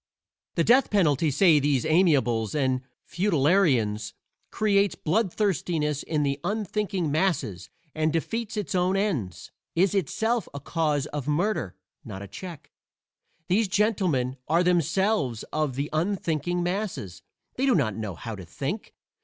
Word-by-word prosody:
The 170 - +2
death 250 +6 +4
penalty, 160 -7 +2
say 155 +2 +5
these 140 -2 +1
amiables 140 - +2
and 130 -3 +1 0.3
futilitarians, 145 - +2 0.4
creates 200 -2 +2
blood 190 +4 0
thirstiness 160 -7 0
in 150 -2 -1
the 140 0 -1
unthinking 200 -4 -1
masses 150 - -1 0.2
and 155 0 +1
defeats 225 +7 -2
its 205 -7 -3
own 185 +1 +2
ends 145 - -2 0.2
is 190 +4 +3
itself 220 - 0
a - - -4
cause 150 -1 0
of 145 -2 -4
murder, 160 - 0 0.3
not 95 +1 -7
a - - -8
check. 170 - -9 0.8
These 200 +4 +2
gentlemen 185 - +1
are 170 +3 +3
themselves 170 - +1
of 150 -4 0
"the 140 +2 -2
unthinking 175 -1 -1
masses" 175 - -3 0.3
they 270 +2 0
do 260 - +4
not 110 -10 +1
know 105 -4 -4
how 115 +4 -6
to 95 - -9
think. 135 - -5
165 Hz, 135 wpm, -26 LUFS, 140-195 Hz, 0.8 s, say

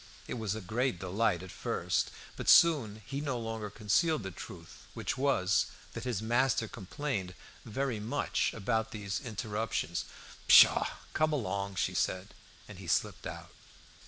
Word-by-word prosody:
It 125 - -4
was 110 -2 -1
a 110 - -5
great 115 +3 0
delight 95 0 0
at 95 - -9
first, - - -1 0.3
but - - -2
soon 115 -11 +5
he 140 +2 -4
no 140 -4 -1
longer 110 -2 -4
concealed 110 - +1
the 95 - -5
truth, 85 -1 -11
which - - -2
was, 130 -9 +2 0.3
that 115 +1 -6
his 115 -5 -2
master 120 0 +2
complained 100 -3 -4 0.3
very 125 0 -2
much 115 +8 0
about 110 +1 0
these 105 -2 -4
interruptions. 110 -6 -2 0.4
"Pshaw! - - +8 0.3
come 155 0 +2
along," 100 -7 -2
she 90 - 0
said. 95 +1 -1 0.3
And - - -10
he - - -9
slipped - - 0
out. - - -8
110 Hz, 150 wpm, -31 LUFS, 100-125 Hz, 0.4 s, Pshaw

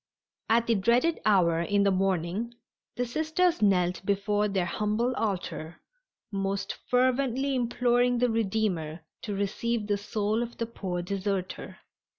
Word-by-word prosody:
At 230 +1 +4
the 235 - +2
dreaded 235 +10 +2
hour 170 -5 +4
in 200 +3 +2
the 200 - +3
morning 190 +4 -1 0.4
the 245 - -1
Sisters 315 +7 +1
knelt 180 -3 +2
before 205 +1 +1
their 195 -3 0
humble 215 +7 0
altar, 180 -5 -3 0.5
most 195 0 -2
fervently 260 +2 +2
imploring 245 0 +2
the 245 0 +2
Redeemer 190 -7 -1 0.2
to 205 -3 -4
receive 210 +3 -1
the 205 -1 0
soul 210 +2 -1
of 240 0 -5
the 230 - -1
poor 185 -6 -4
deserter. 195 0 -3
210 Hz, 135 wpm, -28 LUFS, 195-240 Hz, 0.5 s, At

